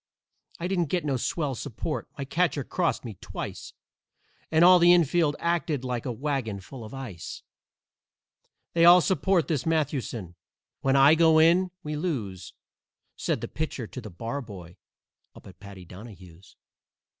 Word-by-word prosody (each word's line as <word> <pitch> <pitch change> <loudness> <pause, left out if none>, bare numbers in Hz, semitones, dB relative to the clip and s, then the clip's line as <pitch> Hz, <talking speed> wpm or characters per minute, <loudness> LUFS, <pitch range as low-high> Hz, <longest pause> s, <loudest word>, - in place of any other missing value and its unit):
I 170 - -3
didn't 180 -3 0
get 175 -1 -1
no 140 -2 0
swell 140 +3 -2
support; 125 +6 -5
my 140 - -4
catcher 150 -1 0
crossed 170 -4 -1
me 110 -6 -8
twice - - -7 0.8
And 160 +2 +5
all 180 0 +8
the 175 0 +6
infield 165 -2 +2
acted 170 -5 -1
like 125 0 -3
a - - -1
wagon 125 -5 -3
full 115 +5 -10
of 110 - -10
ice. 125 -12 -8 1.3
They 170 - +3
all 175 +1 +8
support 190 -1 +1
this 150 -7 -1
Mathewson. 135 - -2 0.5
When 135 0 +1
I 135 +2 +7
go 160 -1 +5
in 170 +4 +4
we 150 0 -4
lose!" 105 - -4 0.6
Said - - -2
the - - -4
Pitcher 150 -6 -4
to 130 - -8
the 110 - -9
Barboy 105 -4 -7 0.6
up - - -15
at 95 - -14
Paddy 100 -3 -11
Donahue's. 90 -2 -13
140 Hz, 150 wpm, -26 LUFS, 110-165 Hz, 1.3 s, all